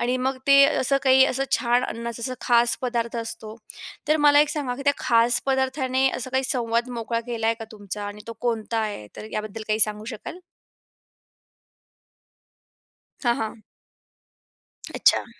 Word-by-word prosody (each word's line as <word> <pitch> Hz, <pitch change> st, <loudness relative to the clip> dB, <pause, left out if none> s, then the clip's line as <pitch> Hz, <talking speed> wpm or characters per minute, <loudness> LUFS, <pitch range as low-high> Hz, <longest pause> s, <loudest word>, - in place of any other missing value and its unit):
आणि 245 Hz, +1 st, 0 dB
मग 260 Hz, +1 st, -1 dB
ते 275 Hz, 0 st, +7 dB
असं, 280 Hz, -1 st, +2 dB
काही 265 Hz, 0 st, +6 dB
असं 270 Hz, 0 st, -1 dB
छान 240 Hz, 0 st, +2 dB
अन्नाचा 235 Hz, 0 st, -5 dB
असं 255 Hz, +1 st, -2 dB
खास 235 Hz, -1 st, +3 dB
पदार्थ 235 Hz, -2 st, -2 dB
असतो. 225 Hz, -1 st, -6 dB, 0.5 s
तर 305 Hz, -, +4 dB
मला 290 Hz, -1 st, +6 dB
एक 300 Hz, -, +3 dB
सांगा, 285 Hz, -5 st, -2 dB
की 275 Hz, -, -6 dB
त्या 285 Hz, -, +4 dB
खास 235 Hz, 0 st, +3 dB
पदार्थाने 265 Hz, 0 st, +1 dB
असा 255 Hz, +1 st, -6 dB
काही 265 Hz, +1 st, 0 dB
संवाद 240 Hz, -2 st, 0 dB
मोकळा 230 Hz, -1 st, -3 dB
केला 230 Hz, -2 st, -2 dB
आहे 230 Hz, -, +3 dB
का 225 Hz, -, -6 dB
तुमचा? 205 Hz, -1 st, -7 dB
आणि 205 Hz, +1 st, -8 dB
तो 230 Hz, -, -6 dB
कोणता 230 Hz, -1 st, -1 dB
आहे 210 Hz, -, -3 dB
तर, -, -, -8 dB
याबद्दल 215 Hz, +1 st, -5 dB
काही 215 Hz, +1 st, +1 dB
सांगू 210 Hz, 0 st, +2 dB
शकाल? 340 Hz, -, -9 dB, 2.8 s
हां, 240 Hz, -1 st, +3 dB
हां. 220 Hz, 0 st, -5 dB, 1.3 s
अच्छा. -, -, +3 dB
240 Hz, 155 wpm, -24 LUFS, 225-265 Hz, 2.8 s, ते